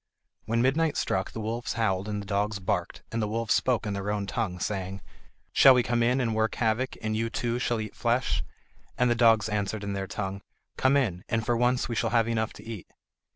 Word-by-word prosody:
When 115 +2 +1
midnight 150 +4 +2
struck 95 0 0
the - - -6
wolves 115 +2 -3
howled 100 -4 0
and 105 -1 -2
the - - -12
dogs 105 +1 0
barked, 90 -2 -2
and 115 - -1
the 105 - 0
wolves 115 +1 0
spoke 125 -3 +1
in 105 - -2
their 100 +1 -3
own 105 -1 -1
tongue, 95 -2 -2
saying: 95 0 -3 0.5
"Shall 135 -1 +8
we 125 - +3
come 120 0 0
in 125 +3 +3
and 115 -3 0
work 110 0 0
havoc, 115 +3 0
and 110 0 -1
you 115 +1 0
too 120 +1 -1
shall 120 -2 0
eat 110 -2 -6
flesh?" 120 - 0 0.5
And 125 -1 +3
the - - +5
dogs 115 -3 +4
answered 105 0 -2
in 100 0 -3
their 95 -1 -3
tongue: 100 0 -4 0.3
"Come 135 +2 +3
in, 95 -10 0
and 115 -2 0
for 120 - +2
once 125 +1 +2
we 120 - -3
shall 115 - 0
have 115 -1 +2
enough 110 -1 0
to - - -13
eat." 110 -5 -7
110 Hz, 225 wpm, -27 LUFS, 100-120 Hz, 0.5 s, Shall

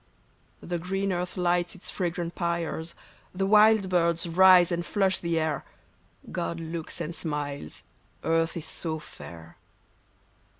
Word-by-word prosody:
The 175 0 -3
green 195 +2 -1
earth 180 +1 -3
lights 175 0 +1
its 185 - -5
fragrant 175 -2 -2
pyres; 170 -1 -2 0.4
The 195 +1 0
wild 210 0 +6
birds 170 -2 +2
rise 180 +1 +6
and 175 0 0
flush 190 +1 +1
the 170 -1 0
air; 155 -1 -1 0.7
God 170 -1 -3
looks 165 0 -5
and 165 0 -3
smiles, 145 - -4 0.4
earth 165 +1 +1
is 165 - -5
so 160 0 -2
fair. 85 - -12
170 Hz, 130 wpm, -27 LUFS, 165-180 Hz, 0.7 s, wild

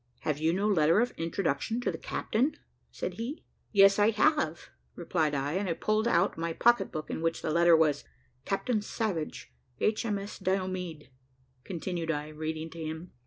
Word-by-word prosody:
"Have 150 -1 -1
you 160 +1 +2
no 195 +4 0
letter 165 -2 +4
of 245 +2 +2
introduction 165 - -1
to - - 0
the - - -6
captain?" 270 +7 -1 0.3
said - - -4
he. 255 +7 -5 0.3
"Yes, 195 -1 +6
I 205 +1 +5
have," 215 - +1 0.2
replied 160 -4 0
I; 140 +2 -1
and 190 +1 -1
I - - +2
pulled 215 +6 0
out 235 - +2
my 165 0 -1
pocketbook 195 -8 +2
in - - -3
which 165 0 -1
the - - -1
letter 170 +1 +6
was. 150 -3 +2 0.4
"Captain 210 - 0
Savage, 205 -7 -3 0.3
H.M.S. 210 -2 -1
Diomede," 185 -6 -2 0.5
continued 170 -1 -4
I, 150 -1 -2
reading 155 +1 -4
to 165 - -10
him. 160 +3 -6
175 Hz, 165 wpm, -29 LUFS, 160-210 Hz, 0.5 s, Yes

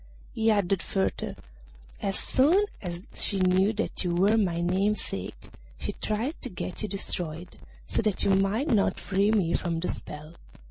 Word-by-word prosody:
He 225 0 +2
added 200 -3 +2
further, 190 -1 -2 0.7
'As 195 -1 0
soon 335 +10 +3 0.2
as 175 -1 -5
she 200 - +1
knew 185 +2 +3
that 220 -1 -1
you 175 -1 0
were 200 +5 +4
my 190 -6 +1
namesake 190 +5 -1 0.3
she - - -3
tried 230 +9 -2
to 255 - -3
get 180 -2 -3
you 215 - -2
destroyed, 175 -3 -3 0.3
so - - 0
that 210 -3 +1
you - - +3
might 195 +9 +2
not 210 -6 +2
free 195 +2 +1
me 195 -6 +2
from 170 -2 -1
the 180 - -2
spell. 150 +2 -5
195 Hz, 165 wpm, -27 LUFS, 180-215 Hz, 0.7 s, were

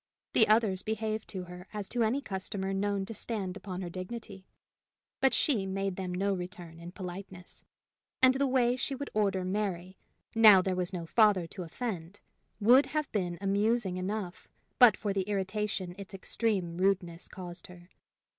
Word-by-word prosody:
The 220 - +5
others 215 -4 +3
behaved 220 0 -3
to 185 -2 -5
her 180 +1 -10
as 205 -2 -3
to 240 - -1
any 240 +6 +1
customer 190 -1 -3
known 200 0 0
to 225 - -7
stand 205 -5 -4
upon 190 -2 -6
her 175 - -4
dignity, 190 +1 -7 0.7
but 270 - +4
she 215 -10 +1
made 195 0 -2
them 185 -1 -4
no 195 +2 0
return 175 -2 -7
in 170 +1 -8
politeness; 180 -1 -9 0.6
and 260 0 +6
the 275 +1 +1
way 250 -2 +3
she 270 +2 -2
would 280 +1 -6
order 195 -3 +1
Mary, 185 -2 -3 0.3
now 215 -4 +9
there 185 0 0
was 180 0 -1
no 175 -3 -4
father 205 -1 +4
to 165 - -8
offend, 180 0 -5 0.4
would 250 +6 +6
have 305 -1 -2
been 180 -5 -1
amusing 200 0 +1
enough 185 -1 -4 0.3
but 245 -3 +8
for 205 -3 -2
the 195 0 -2
irritation 195 -2 -2
its 195 -1 -8
extreme 190 -4 -1
rudeness 180 -3 0
caused 175 -2 -9
her. 180 0 -15
195 Hz, 165 wpm, -30 LUFS, 180-215 Hz, 0.7 s, now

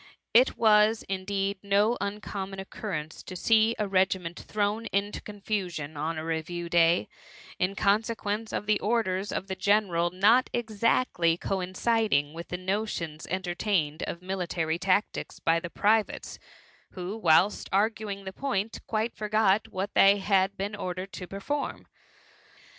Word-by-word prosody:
It 250 +3 +5
was, 215 0 +4
indeed, 195 +1 -2
no 205 +3 +2
uncom 200 -1 -4
mon 195 0 -8
occurrence 160 -5 -5
to 185 - -9
see 225 +4 +3
a 210 - -1
regiment 185 -2 0
thrown 210 +2 -1
into 200 +1 -1
confusion 190 -7 -4
on 155 +3 -2
a 155 - -4
review 165 +1 -3
day, 170 -8 +4 0.5
in 185 +2 0
consequence 210 +1 0
of - - -3
the 210 0 +2
orders 205 -3 0
of - - -3
the 190 -1 -4
general 185 -3 +2
not 210 +8 +4
exactly 220 -6 +1
coin 185 0 -3
ciding 210 -11 +1
with 170 +1 -7
the 180 - -4
notions 185 -5 -3
entertained 175 -3 -1
of 170 - -6
military 175 -3 -2
tactics 195 +3 0
by 165 0 +2
the 170 0 -6
privates, 215 +4 0 0.5
who, 185 +2 -5
whilst 180 -1 +3
arguing 205 0 0
4;be 190 - -6
point, 225 -3 -2
quite 220 +1 -1
forgot 215 -1 +2
what 200 -1 -4
they 200 +1 +6
had 195 0 +1
been 200 +2 -3
ordered 185 -1 -5
to 180 - -7
perform. 275 +10 -4
195 Hz, 140 wpm, -28 LUFS, 180-210 Hz, 0.5 s, they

